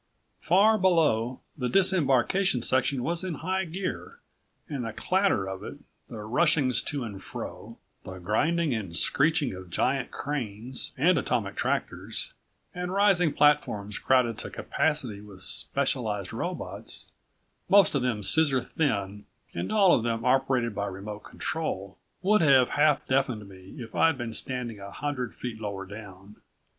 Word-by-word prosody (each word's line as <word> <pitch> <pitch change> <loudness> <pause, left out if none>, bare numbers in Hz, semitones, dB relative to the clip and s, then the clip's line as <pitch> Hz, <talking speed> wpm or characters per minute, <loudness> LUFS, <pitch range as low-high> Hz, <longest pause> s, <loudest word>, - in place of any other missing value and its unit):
Far 210 +5 +4
below 150 -10 +2
the 125 -4 -2
disembarkation 180 -5 +3
section 130 0 +1
was 170 +4 -1
in 185 -4 -3
high 190 +5 -2
gear, 185 +3 -5 0.5
and 140 -4 -4
the 115 -1 -5
clatter 185 - +1
of 95 0 -6
it, - - -8 0.3
the 110 -2 -7
rushings 130 +1 +2
to 140 -4 -2
and 100 -4 -8
fro, - - -8 0.3
the 95 0 -8
grinding 145 - 0
and 95 -7 -3
screeching 150 - +2
of 95 -1 -10
giant 130 +9 0
cranes, 125 -3 -4
and 170 +8 +4
atomic - - -2
tractors, - - -3 0.4
and 180 -1 -4
rising 190 -4 +3
platforms 140 -9 +1
crowded 125 -4 +2
to - - -5
capacity 130 -10 -1
with 100 -3 -7
specialized 115 -8 0
robots, - - -3 0.6
most 195 -2 +6
of 140 - +1
them 120 -5 -1
scissor 135 +7 +6
thin 105 -8 -2 0.3
and 85 - -4
all 200 -4 +5
of - - +3
them 115 0 -2
operated 130 -3 +2
by 100 0 -3
remote 100 +2 -7
control... 100 -12 -4 0.2
would 210 +2 +4
have 135 -5 +5
half 150 -1 +2
deafened 130 -6 0
me 95 -1 -13
if 115 -2 -9
I'd 165 -3 +3
been 120 -3 -5
standing 120 -3 -3
a 100 0 -8
hundred 125 -5 -4
feet 110 +2 -6
lower 100 -2 -4
down. 100 0 -11
125 Hz, 145 wpm, -27 LUFS, 105-160 Hz, 0.6 s, most